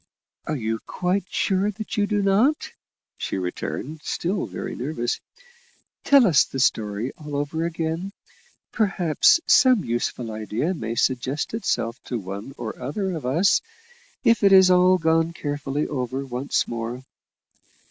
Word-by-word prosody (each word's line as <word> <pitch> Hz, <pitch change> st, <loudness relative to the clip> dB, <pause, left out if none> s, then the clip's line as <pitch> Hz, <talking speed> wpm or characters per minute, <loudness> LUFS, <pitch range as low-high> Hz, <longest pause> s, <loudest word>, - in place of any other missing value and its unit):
"Are 155 Hz, -, -1 dB
you 110 Hz, -3 st, -2 dB
quite 185 Hz, +1 st, -1 dB
sure 195 Hz, +1 st, +1 dB
that 215 Hz, +2 st, -6 dB
you 205 Hz, -2 st, +1 dB
do 205 Hz, -1 st, 0 dB
not?" 220 Hz, +10 st, +2 dB, 0.5 s
she -, -, -3 dB
returned, 130 Hz, -, -4 dB
still 180 Hz, +5 st, -2 dB
very -, -, -6 dB
nervously. 125 Hz, -2 st, -3 dB, 0.8 s
"Tell 280 Hz, -3 st, +6 dB
us 170 Hz, -8 st, +5 dB
the 135 Hz, -, -6 dB
story 110 Hz, -1 st, 0 dB
all 150 Hz, -2 st, -6 dB
over 155 Hz, +3 st, -1 dB
again; 165 Hz, +3 st, -3 dB, 0.6 s
perhaps 195 Hz, -, +3 dB
some 255 Hz, -7 st, +5 dB
useful 120 Hz, 0 st, -2 dB
idea 110 Hz, -, -2 dB
may 115 Hz, -8 st, -4 dB
suggest 130 Hz, -, -1 dB
itself 130 Hz, -, -2 dB
to 125 Hz, -, -3 dB
one 100 Hz, +6 st, -7 dB
or 115 Hz, 0 st, -6 dB
other 190 Hz, +10 st, -2 dB
of 155 Hz, -7 st, -4 dB
us, 170 Hz, +9 st, +3 dB, 0.6 s
if 230 Hz, -1 st, +4 dB
it 200 Hz, -1 st, +5 dB
is 190 Hz, -1 st, +7 dB
all 180 Hz, +1 st, +5 dB
gone 165 Hz, 0 st, +1 dB
carefully 145 Hz, -2 st, -3 dB
over 130 Hz, 0 st, -3 dB
once 130 Hz, +2 st, -1 dB
more." 120 Hz, +2 st, -5 dB
155 Hz, 140 wpm, -24 LUFS, 125-190 Hz, 0.8 s, is